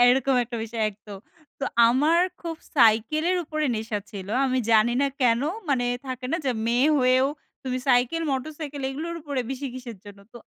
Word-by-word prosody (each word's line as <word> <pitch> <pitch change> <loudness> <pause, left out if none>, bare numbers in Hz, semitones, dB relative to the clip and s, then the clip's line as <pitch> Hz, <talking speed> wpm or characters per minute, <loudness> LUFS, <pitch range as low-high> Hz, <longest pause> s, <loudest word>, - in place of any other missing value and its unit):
এরকম 270 +1 +2
একটা 235 0 -6
বিষয় 225 0 -4
একদম। 205 -1 -12 0.4
তো - - 0 0.2
আমার 300 +8 +3 0.2
খুব 330 -2 -5 0.2
সাইকেলের 265 +9 +3
উপরে 310 -1 -2
নেশা 220 -1 -3
ছিল। 195 -2 -8 0.2
আমি 260 -1 +1
জানি 220 +2 +5
না - - +3
কেন 235 -2 +3 0.3
মানে 255 -3 +1 0.2
থাকে 255 -1 -5
না - - +2
যে - - +3 0.2
মেয়ে 245 +5 +3
হয়েও 255 +1 +4 0.4
তুমি 255 -1 -2
সাইকেল 250 +6 +3
মোটরসাইকেল 290 +1 -5
এগুলোর 320 +5 -5
উপরে 285 -3 -2
বেশি 270 +1 -4
কিসের 245 -3 -8
জন্য? 205 -1 -12
তো - - -11
255 Hz, 170 wpm, -25 LUFS, 235-290 Hz, 0.4 s, জানি